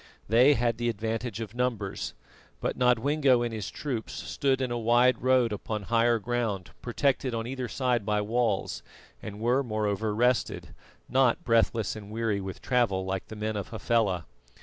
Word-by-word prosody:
They 125 Hz, +7 st, +6 dB
had 120 Hz, -1 st, 0 dB
the 120 Hz, 0 st, +1 dB
advantage 115 Hz, +1 st, -3 dB
of 110 Hz, -, -6 dB
numbers; 120 Hz, -5 st, -2 dB, 0.4 s
but -, -, -2 dB
Nodwengo 125 Hz, +1 st, +3 dB
and 120 Hz, -1 st, -3 dB
his 105 Hz, -4 st, -4 dB
troops 125 Hz, -7 st, -4 dB
stood 135 Hz, -1 st, -1 dB
in 130 Hz, -2 st, -1 dB
a 120 Hz, -, -1 dB
wide 120 Hz, +2 st, +3 dB
road 125 Hz, -3 st, +3 dB
upon 105 Hz, +1 st, -4 dB
higher 115 Hz, +2 st, +3 dB
ground 105 Hz, -7 st, -2 dB
protected 130 Hz, 0 st, 0 dB
on 115 Hz, 0 st, -2 dB
either 130 Hz, 0 st, -4 dB
side 125 Hz, -3 st, 0 dB
by 105 Hz, 0 st, +1 dB
walls, 110 Hz, -1 st, 0 dB, 0.4 s
and 105 Hz, -1 st, -7 dB
were, 120 Hz, +4 st, +2 dB
moreover, 110 Hz, -3 st, -1 dB
rested, 125 Hz, +2 st, 0 dB, 0.3 s
not 135 Hz, +5 st, +2 dB
breathless 115 Hz, -3 st, +2 dB
and 105 Hz, -2 st, -9 dB
weary 110 Hz, -2 st, -1 dB
with 95 Hz, -1 st, -7 dB
travel 110 Hz, -7 st, +1 dB
like 95 Hz, 0 st, -3 dB
the 110 Hz, -, -8 dB
men 110 Hz, 0 st, -3 dB
of 100 Hz, -2 st, -3 dB
Hafela. 105 Hz, -6 st, 0 dB
115 Hz, 165 wpm, -28 LUFS, 105-125 Hz, 0.4 s, They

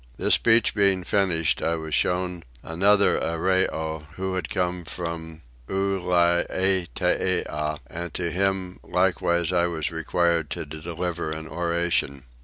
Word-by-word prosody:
This -, -, +3 dB
speech 115 Hz, -1 st, +4 dB
being 100 Hz, -2 st, +2 dB
finished 90 Hz, -4 st, +1 dB
I 85 Hz, -, +1 dB
was 80 Hz, -1 st, -6 dB
shown 90 Hz, +1 st, 0 dB, 0.2 s
another 100 Hz, +5 st, +3 dB
Arreoy, 80 Hz, -2 st, 0 dB
who 95 Hz, 0 st, -3 dB
had 90 Hz, -3 st, -3 dB
come 90 Hz, -1 st, -1 dB
from 80 Hz, -1 st, -5 dB, 0.3 s
Ulietea, 90 Hz, -4 st, +1 dB
and 85 Hz, 0 st, -6 dB
to 85 Hz, -2 st, -2 dB
him 95 Hz, 0 st, -1 dB
likewise 85 Hz, -2 st, +1 dB
I 85 Hz, -1 st, +3 dB
was 80 Hz, -2 st, -2 dB
required 80 Hz, -1 st, 0 dB
to 80 Hz, -, -4 dB
deliver 85 Hz, +2 st, -4 dB
an 80 Hz, 0 st, -5 dB
oration. 85 Hz, -4 st, -1 dB
85 Hz, 120 wpm, -25 LUFS, 80-95 Hz, 0.3 s, speech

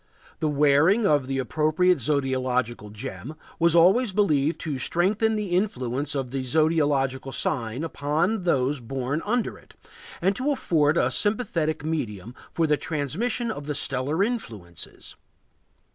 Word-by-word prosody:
The 160 Hz, -, 0 dB
wearing 150 Hz, +9 st, +4 dB
of 145 Hz, -6 st, +2 dB
the 135 Hz, 0 st, -2 dB
appropriate 155 Hz, +5 st, +2 dB
zodiacal 130 Hz, -5 st, -1 dB
gem 110 Hz, -, -7 dB, 0.2 s
was 170 Hz, 0 st, +3 dB
always 195 Hz, +8 st, +5 dB
believed 160 Hz, -7 st, +2 dB
to 150 Hz, -5 st, -3 dB
strengthen 205 Hz, -, +1 dB
the 210 Hz, -2 st, -3 dB
influence 140 Hz, -, -1 dB
of 130 Hz, -3 st, -3 dB
the 135 Hz, 0 st, -2 dB
zodiacal 140 Hz, -2 st, +1 dB
sign 125 Hz, -1 st, -1 dB
upon 165 Hz, +7 st, 0 dB
those 140 Hz, -5 st, +1 dB
born 130 Hz, +4 st, -3 dB
under 235 Hz, +3 st, -1 dB
it, -, -, -21 dB, 0.4 s
and 190 Hz, +3 st, +1 dB
to 260 Hz, +6 st, 0 dB
afford 160 Hz, -, +2 dB
a -, -, +2 dB
sympathetic 170 Hz, -9 st, 0 dB
medium 120 Hz, -, -3 dB, 0.2 s
for 165 Hz, -, +1 dB
the 150 Hz, -1 st, +2 dB
transmission 180 Hz, -, -2 dB
of 145 Hz, -8 st, -7 dB
the 150 Hz, -, -2 dB
stellar 140 Hz, +9 st, 0 dB
influences. 110 Hz, -, -6 dB
150 Hz, 135 wpm, -25 LUFS, 130-180 Hz, 0.4 s, always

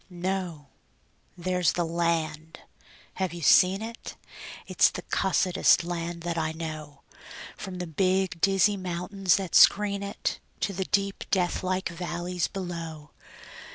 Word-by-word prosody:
No! 175 Hz, -5 st, -4 dB, 0.7 s
There's 180 Hz, -1 st, +1 dB
the 175 Hz, -, 0 dB
land. 160 Hz, -1 st, -2 dB, 0.6 s
(Have 180 Hz, -2 st, -1 dB
you 170 Hz, -, -7 dB
seen 190 Hz, +7 st, +5 dB
it?) 230 Hz, +1 st, -8 dB, 0.5 s
It's -, -, +4 dB
the -, -, -7 dB
cussedest 185 Hz, -2 st, +2 dB
land 170 Hz, 0 st, -4 dB
that 170 Hz, -1 st, -2 dB
I 160 Hz, 0 st, -1 dB
know, 155 Hz, -3 st, -7 dB, 0.5 s
From 190 Hz, -1 st, -7 dB
the 180 Hz, -, -4 dB
big, 185 Hz, +1 st, 0 dB
dizzy 195 Hz, +1 st, +3 dB
mountains 185 Hz, +1 st, 0 dB
that 190 Hz, -4 st, -4 dB
screen 200 Hz, -1 st, +5 dB
it 200 Hz, 0 st, -3 dB, 0.2 s
To 200 Hz, -, -1 dB
the 190 Hz, 0 st, -2 dB
deep, 200 Hz, 0 st, -1 dB
deathlike 185 Hz, 0 st, 0 dB
valleys 175 Hz, 0 st, -3 dB
below. 165 Hz, -5 st, -6 dB
180 Hz, 125 wpm, -27 LUFS, 165-190 Hz, 0.7 s, seen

